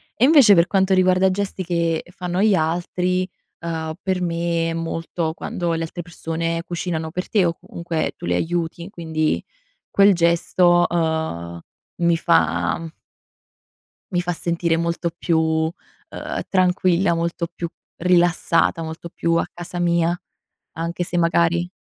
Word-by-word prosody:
E 240 - +4
invece 275 -8 +7
per 170 0 +5
quanto 190 -1 +2
riguarda 185 +1 +4
gesti 195 -1 -3
che 170 -2 0
fanno 180 +1 -2
gli 210 -2 +4
altri, 180 +3 0 0.3
ehm, 160 -1 -4
per 185 -1 -1
me 170 -1 0
è - - -3
molto 165 0 -3
quando 175 0 -3
le 165 0 -1
altre 175 +2 -5
persone 165 0 -3
cucinano 165 -2 -3
per 180 +2 -4
te, 200 -5 +3
o 170 - +1
comunque 170 -2 -3
tu - - -8
li 90 - 0
aiuti, 170 - -2
quindi 160 -4 -1 0.5
quel 200 0 +5
gesto, 175 +1 +3
uhm, 160 - -2 0.4
mi 170 -1 +3
fa 90 - +1 1.2
mi 175 - +2
fa 175 0 -1
sentire 170 0 0
molto 170 0 -1
più, 170 -2 +1
uhm, 160 0 +1 0.8
tranquilla, 185 -1 +2
molto 170 0 -2
più 170 -1 -4 0.3
rilassata, 175 -1 +2
molto 160 +1 -7
più 170 0 -1
a - - +1
casa 175 +1 -7
mia 170 0 +1 0.5
anche 170 +2 -3
se 175 0 -2
magari 170 +1 +2
170 Hz, 140 wpm, -21 LUFS, 165-180 Hz, 1.2 s, invece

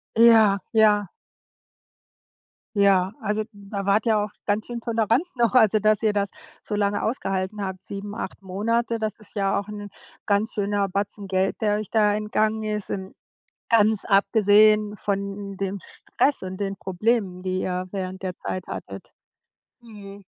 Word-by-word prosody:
Ja, 225 -3 +6 0.2
ja. 210 -3 +4 1.7
Ja, 195 -1 +3
also, 215 0 -1
da 200 -1 -6
wart 205 +2 +3
ihr 220 -2 +3
auch 210 0 -1 0.2
ganz 210 +1 0
schön 240 -1 -5
tolerant 230 +3 +1
noch, 235 -2 +2
also, 220 -3 +5
dass 215 +1 +2
ihr 215 - +3
das 200 -1 0 0.3
so 210 - -4
lange 205 0 0
ausgehalten 195 -3 -2
habt. 190 -1 -6
7, 200 +1 -6
8 - - -6
Monate, 230 +5 -1
das 215 -2 -3
ist 215 - -12
ja 195 -1 +1
auch 200 - -7
'n 205 -1 -7 0.4
ganz 205 +2 +1
schöner 205 -1 0
Batzen 200 +1 -3
Geld, 190 0 0
der 210 -1 +2
euch 215 - -6
da 210 -2 +3
entgangen 215 +1 0
ist 210 -1 -3
in 190 0 -5 0.6
Ganz 215 -2 +4
abgesehen 210 +1 +4
von, 200 0 -1 0.2
hm, 200 -1 -7
dem 195 +1 -3
Stress 285 +9 -1
und 185 0 -6
den 195 -1 -3
Problemen, 190 -1 -1
die 185 0 -2
ihr 185 0 -3
während 190 -1 -5
der 185 -1 -4
Zeit 185 -1 -5
hattet. - - -8 0.7
Mhm. 205 -3 -12
205 Hz, 160 wpm, -24 LUFS, 195-215 Hz, 1.7 s, Ja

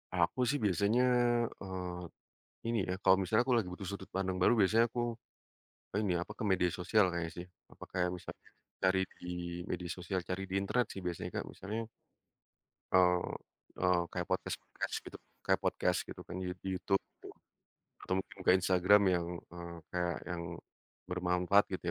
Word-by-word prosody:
Aku - - +2
sih 145 - +2
biasanya 100 +6 +3 0.6
eee, 90 -2 -6 0.4
ini 115 0 +1
ya - - +1
kalau 95 0 +7
misalnya 95 +6 +3
aku 130 - +2
lagi 105 -6 0
butuh 95 +2 -7
sudut 100 -1 -6
pandang 95 -1 0
baru 90 - +6
biasanya 110 +4 +5
aku, 120 - -2 1.0
ini 100 -4 +1
apa 95 - -6
ke - - -2
media 90 -1 +3
sosial 95 +4 +4
kayaknya 85 -1 -2
sih, 85 - -5 0.3
apa - - -12
kayak 90 -1 +1
bisa - - -10 0.5
cari 95 0 +4 0.2
di - - -10 0.5
media 90 0 -3
sosial, 90 +1 -2
cari 90 +1 -1
di 95 - -2
internet 120 +5 +1
sih 95 - -6
biasanya 90 -2 -3
Kak, - - -2
misalnya 110 +4 -4 1.1
eee, 90 -1 +5 0.6
eee, 90 -1 +3
kayak - - -2
podcast-podcast - - -2
gitu - - -8 0.3
kayak - - +3
podcast - - +1
gitu - - -8
kan 85 - -7
di 90 - -2
YouTube 90 0 -7
gitu, 95 +1 -2 1.1
atau 95 - 0
mungkin 95 - -13
ke - - +6
Instagram 95 +2 +5
yang 85 -1 +1 0.3
eee, 85 -1 -7 0.2
kayak 90 -1 0
yang 90 -1 -3 0.7
bermanfaat 90 +2 +3
gitu 95 - -4
95 Hz, 160 wpm, -33 LUFS, 90-100 Hz, 1.1 s, kalau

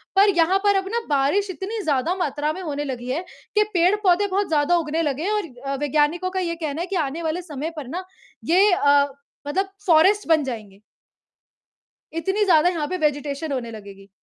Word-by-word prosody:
पर 400 +2 +6
यहाँ 355 +4 +4
पर 405 -1 +4
अब 385 0 0
ना 470 - +1
बारिश 295 +8 +1
इतनी 395 +5 -4
ज़्यादा 290 +2 +1
मात्रा 300 -4 -1
में 375 - -7
होने 290 -4 -3
लगी 250 -2 -5
है 310 +8 -1 0.3
कि 425 - +5
पेड़-पौधे 370 +2 +3
बहुत 395 +1 0
ज़्यादा 310 +2 +2
उगने 320 0 -1
लगे 295 -1 -1
हैं 400 - 0
और 420 -1 0 0.2
अ, 275 0 -1
वैज्ञानिकों 300 +5 +1
का 375 - -2
ये 335 -2 -2
कहना 315 -1 -4
है 355 - -3
कि 390 - -4
आने 320 0 -2
वाले 320 +2 -1
समय 310 -2 -5
पर 295 -5 -7
ना 360 +7 -5 0.5
ये 395 +3 +6
अ, 285 -4 +4 0.4
मतलब 385 +7 -1 0.2
फ़ॉरेस्ट 375 +5 +4
बन 320 -2 +4
जाएँगे। 215 -7 -7 1.3
इतनी 385 +6 0
ज़्यादा 350 -2 +5
यहाँ 320 -4 -2
पे 370 - -3
वेजिटेशन 290 +1 -4
होने 245 -4 -3
लगेगी। 200 -2 -11
325 Hz, 195 wpm, -23 LUFS, 285-375 Hz, 1.3 s, पर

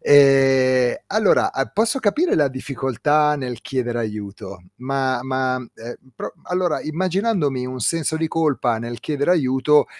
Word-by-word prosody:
Ehm, 135 -3 +5
allora 215 -1 +2
a 135 - -1
posso 225 +6 0
capire 295 - +1
la 150 - +3
difficoltà 135 +3 0
nel 125 -4 -5
chiedere 120 -3 -3
aiuto, 100 -3 -6
ma 130 0 -1
ma, 130 0 -1
ehm, 120 -1 -9 0.2
pro - - -6
allora 180 -3 -1
immaginandomi 170 - -1
un 130 0 -6
senso 160 +5 0
di 160 0 -1
colpa 145 -8 0
nel 120 0 -6
chiedere 145 +5 0
aiuto, 145 -1 +3
135 Hz, 140 wpm, -21 LUFS, 125-160 Hz, 0.2 s, Ehm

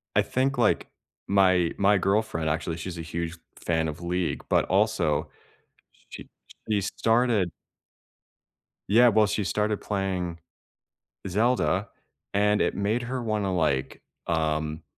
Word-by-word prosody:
I - - +5
think, 135 +1 0
like, 115 -3 +2 0.4
my 95 -3 +3
my 100 +1 +4
girlfriend, 95 -5 0
actually, 80 +1 -2
she's 85 +1 -6
a 85 - -4
huge 85 +1 -4 0.2
fan 80 -1 0
of 80 +2 -6
League, 90 0 -2
but - - +3
also 75 +1 +1 0.8
she - - -10 0.4
she 105 -1 +2
started 115 -2 +1 1.4
Yeah, 120 +4 +6
well, 110 -1 +4
she 105 +1 -1
started 105 +1 0
playing 95 -4 -2 0.9
Zelda, 105 -4 +1 0.5
and 105 +1 +2
it - - +1
made 105 +4 0
her 125 +1 -3
wanna, 105 -4 -1
like, 75 -7 0 0.3
um, 80 -1 -1
95 Hz, 125 wpm, -26 LUFS, 85-105 Hz, 1.4 s, Yeah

